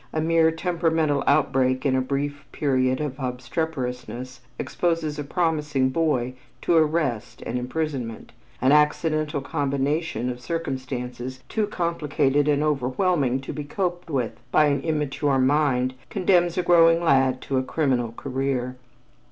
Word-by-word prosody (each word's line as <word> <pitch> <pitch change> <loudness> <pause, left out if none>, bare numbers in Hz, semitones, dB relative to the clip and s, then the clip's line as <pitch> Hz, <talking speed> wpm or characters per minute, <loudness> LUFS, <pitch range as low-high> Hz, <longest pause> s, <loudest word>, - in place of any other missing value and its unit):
A 155 - -1
mere 160 0 +4
temperamental 160 -4 0
outbreak 130 0 +2
in 135 -2 +3
a 130 - +2
brief 140 +2 -3
period 130 -3 +1
of 145 -2 -4
obstreperousness 125 -1 -4 0.2
exposes 165 -4 -1
a - - -2
promising 150 -4 0
boy 130 -4 0 0.3
to 170 - +3
arrest 150 -8 0
and 125 +2 -2
imprisonment, 125 -4 -4 0.3
an 130 - +5
accidental 150 0 +2
combination 140 0 -1
of 125 0 -8
circumstances 130 -3 -4
too 215 +6 -1
complicated 150 -6 0
and 145 0 +2
overwhelming 140 -1 +1
to 135 - -6
be 150 - -4
coped 175 +3 -3
with 130 -6 -2
by 155 - +5
an 140 -2 +1
immature 145 -2 0
mind, 130 -2 +2 0.2
condemns 180 -3 +2
a 180 - +2
growing 165 -1 +5
lad 135 -4 +3
to 135 -1 0
a - - -1
criminal 130 -6 0
career. 130 -1 -2
145 Hz, 135 wpm, -24 LUFS, 130-160 Hz, 0.3 s, an